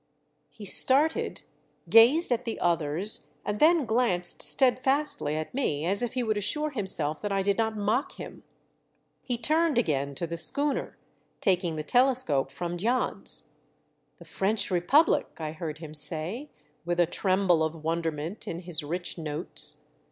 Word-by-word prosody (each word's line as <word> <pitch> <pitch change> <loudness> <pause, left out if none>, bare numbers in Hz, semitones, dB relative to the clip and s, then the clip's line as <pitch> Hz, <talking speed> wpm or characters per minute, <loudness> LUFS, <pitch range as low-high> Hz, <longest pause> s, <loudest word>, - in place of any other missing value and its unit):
He 205 +8 -12
started, 275 +10 +2 0.4
gazed 250 +8 +5
at 240 0 0
the 230 -2 -5
others, 170 +4 0 0.2
and 210 0 -3
then 320 -2 +4
glanced 220 -7 +2
steadfastly 260 - +3
at 155 0 -5
me 160 - -2
as 195 +5 +1
if 240 - -3
he 255 -1 -2
would 215 -2 -1
assure 300 +9 -1
himself 175 - +3
that 205 - -4
I 195 -1 0
did 200 0 +1
not 220 -1 -1
mock 215 +7 -1
him. - - -11 0.8
He 245 -2 -3
turned 310 +4 0
again 140 - -1
to 170 - -3
the 170 0 -6
schooner, 285 - -2 0.4
taking 180 -3 0
the 155 - -5
telescope 245 - +1
from 175 0 -5
Jans. 240 +6 -2 0.8
''The - - -14
French 205 +1 -1
Republic!" 225 - +2
I 155 -2 -5
heard 155 -1 -7
him 155 -1 -10
say, 165 - +2 0.3
with 175 +1 -3
a 175 - +5
tremble 185 -1 0
of 160 0 -3
wonderment 165 +2 -4
in 170 - -5
his 175 -3 +1
rich 175 +4 -5
notes. 155 +2 -5
190 Hz, 150 wpm, -26 LUFS, 165-245 Hz, 0.8 s, gazed